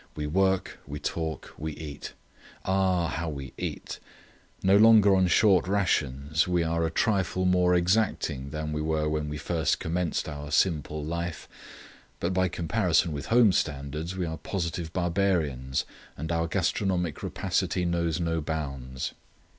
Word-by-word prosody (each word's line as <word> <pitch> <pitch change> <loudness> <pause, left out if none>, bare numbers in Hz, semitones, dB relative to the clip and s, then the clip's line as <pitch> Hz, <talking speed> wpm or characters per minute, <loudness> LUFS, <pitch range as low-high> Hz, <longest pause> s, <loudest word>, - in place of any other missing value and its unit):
We 75 - -3
work; 95 +4 +1
we 75 +1 -5
talk; 80 -3 -4
we 80 0 -3
eat. 75 -2 -8 0.5
Ah, 95 -2 +2
how 85 +1 -3
we 70 -3 -7
eat! - - -5 0.6
No 95 +1 +5
longer 105 -2 +7
on 95 -1 +3
short 95 0 +4
rations, 75 -5 +1
we 90 -2 +2
are 85 0 0
a 80 - +1
trifle 95 0 +1
more 90 -1 +4
exacting 85 -7 +1
than 75 +1 -4
we 75 - -2
were 75 0 0
when 75 -1 -1
we 75 - -4
first 80 0 0
commenced 85 0 -1
our 75 -1 -6
'simple 75 -2 +1
life,' 85 +1 -4 0.7
but 85 +2 -1
by 95 0 +2
comparison 85 -1 +1
with 70 -1 -5
home 115 -3 +5
standards 75 +3 -2
we 90 - -1
are 80 -1 -4
positive 85 -2 -3
barbarians, 85 -8 0 0.3
and 80 +4 -4
our 85 0 0
gastronomic 90 -2 0
rapacity 90 - -1
knows 85 -1 0
no 85 -1 0
bounds. 70 -5 -4
85 Hz, 145 wpm, -27 LUFS, 75-95 Hz, 0.7 s, longer